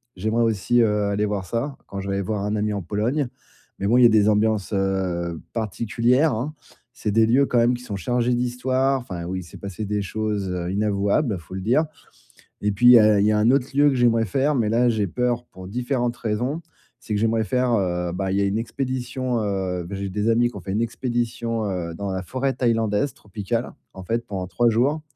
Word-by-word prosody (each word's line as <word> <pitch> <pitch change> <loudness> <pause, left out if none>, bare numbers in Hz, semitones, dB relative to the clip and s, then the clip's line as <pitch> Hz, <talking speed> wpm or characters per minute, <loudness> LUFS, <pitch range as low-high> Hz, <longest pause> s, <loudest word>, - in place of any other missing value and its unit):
J'aimerais 110 +5 0
aussi, 115 +2 +1
heu, 105 -2 +2
aller 100 +1 0
voir 100 -3 -2
ça, 120 +8 -3
quand 100 - -6
j'irai 100 0 -2
voir 105 0 -2
un 105 +1 -1
ami 105 0 0
en 100 - -2
Pologne. 115 - -1 0.5
Mais 100 - -1
bon, 120 +4 +4
il 125 - +6
y - - +9
a - - +8
des 110 -1 +4
ambiances, 105 -1 +1
heu, 90 -4 -1
particulières, 120 - +1
hein. 125 +8 -3 0.4
C'est 110 -5 -3
des 110 +2 +4
lieux, 130 +5 +4
quand 125 - +1
même, 120 +1 +3
qui 120 - -9
sont 105 -5 -5
chargés 120 +5 0
d'Histoire. 130 +2 0
Enfin, 90 -7 -6
où 95 +2 -4
il 95 - -4
s'est 85 - -12
passé 100 +2 -5
des 105 0 -1
choses 105 0 -2 0.2
inavouables, 100 +3 +1
faut 85 +2 -13
le 95 - -4
dire. 125 +11 +2 0.8
Et 105 - +1
puis, 105 +5 +3
il - - +11
y 120 - +9
a 105 -1 +5
il 100 - +3
y - - +4
a - - +2
un 110 +3 +4
autre 135 -1 +2
lieu 145 +1 +5
que 135 - 0
j'aimerais 115 -2 +3
faire, 135 +8 +1
mais 115 -5 +1
là, 120 +2 +3
j'ai 110 -3 +1
peur 120 +4 -1
pour 95 0 -11
différentes 120 +2 -1
raisons. 120 +8 -2 0.4
C'est 110 - -5
que - - 0
j'aimerais 115 0 +2
faire, 125 +1 +1
heu 90 -3 -1
bah, 95 0 -2
il 95 - +1
y - - +2
a - - +2
une 100 +2 0
expédition, 130 +1 -2
heu 95 -3 -2
beh, 95 +3 -6
j'ai 100 0 -4
des 105 +3 -2
amis 120 +1 +3
qui 120 - -15
ont - - -8
fait 95 - -6
une 105 - +1
expédition, 115 -1 -2
heu, 85 -3 -3
dans 100 +3 -4
la 95 0 -3
forêt 130 +8 -1
thaïlandaise 115 0 0
tropicale, 105 +3 -4 0.2
en 95 - -9
fait, 115 +5 -2
pendant 95 -2 -4
3 120 +5 +2
jours. 135 +7 +1
110 Hz, 230 wpm, -23 LUFS, 100-120 Hz, 0.8 s, il